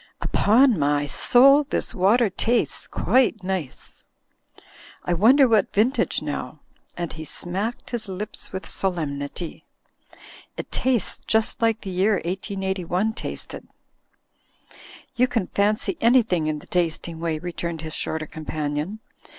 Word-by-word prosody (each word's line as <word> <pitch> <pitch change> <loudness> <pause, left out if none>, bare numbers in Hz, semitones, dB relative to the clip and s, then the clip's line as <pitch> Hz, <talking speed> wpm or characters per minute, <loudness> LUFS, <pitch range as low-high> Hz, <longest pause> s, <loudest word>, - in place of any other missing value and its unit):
Upon 235 - +4
my 145 0 +1
soul, 275 - +6
this - - -2
water 205 +4 +3
tastes 235 +5 0
quite 240 -5 +1
nice. 185 -7 -4 1.0
I 175 - +1
wonder 255 - +6
what 220 -4 +2
vintage 235 +7 +1
now?" - - -4 0.4
and 175 -1 -4
he 155 - -7
smacked 190 +9 -4
his 240 -2 -3
lips 195 +3 -5
with 190 0 -5
solemnity. 160 -3 -3 0.9
"It - - -6
tastes 255 -6 -1
just 220 +1 +1
like 225 -1 +2
the 195 - -6
year 190 +4 +2
1881 190 +1 -2
tasted." - - -7 1.5
"You 250 +1 +3
can 230 -6 -1
fancy 210 - 0
anything 225 -9 +3
in 155 -1 -1
the - - -12
tasting 170 -1 -2
way," 165 -1 -1
re 175 +2 -6
turned 170 -2 -4
his 160 -1 -7
shorter 160 -1 -2
companion. 155 +5 -4
190 Hz, 125 wpm, -24 LUFS, 165-225 Hz, 1.5 s, soul